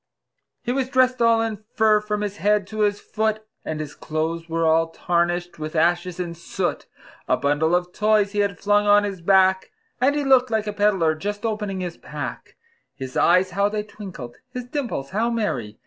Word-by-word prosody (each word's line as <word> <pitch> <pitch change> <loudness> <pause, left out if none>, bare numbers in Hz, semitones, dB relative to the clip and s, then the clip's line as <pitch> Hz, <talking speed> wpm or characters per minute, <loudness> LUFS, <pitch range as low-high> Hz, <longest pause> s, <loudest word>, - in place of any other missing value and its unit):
He 240 - -1
was 260 0 -1
dressed 255 -2 +2
all 230 -1 +4
in 220 -2 -4
fur 215 -2 +4
from 210 0 -2
his 205 -1 -3
head 210 0 +2
to 215 +2 -8
his 205 -1 +2
foot, 215 0 -2 0.2
And 155 -1 -4
his 150 -2 -5
clothes 165 +1 -3
were 165 0 0
all 165 +1 +3
tarnished 175 0 -1
with 155 +1 -5
ashes 175 +2 +1
and 170 -2 -4
soot; 170 - -3 0.4
A - - +2
bundle 150 +4 +2
of 180 0 -2
toys 210 -1 +2
he 205 - -2
had 200 -3 0
flung 205 +2 +2
on 205 0 +6
his 195 -3 -4
back, 190 +1 +3 0.3
And 280 +3 +3
he 295 - 0
looked 260 -2 +4
like 220 -1 0
a 210 - -3
peddler 200 -6 +2
just 205 +7 -4
opening 210 -4 -2
his 175 -2 -5
pack; - - -7 0.4
His 130 -2 -7
eyes 185 +1 +4
how 200 +3 +1
they 210 0 -2
twinkled! 190 - -9
his 250 -1 -6
dimples 245 - -4
how 225 +4 +1
merry! 130 - -2
200 Hz, 195 wpm, -23 LUFS, 170-215 Hz, 0.4 s, on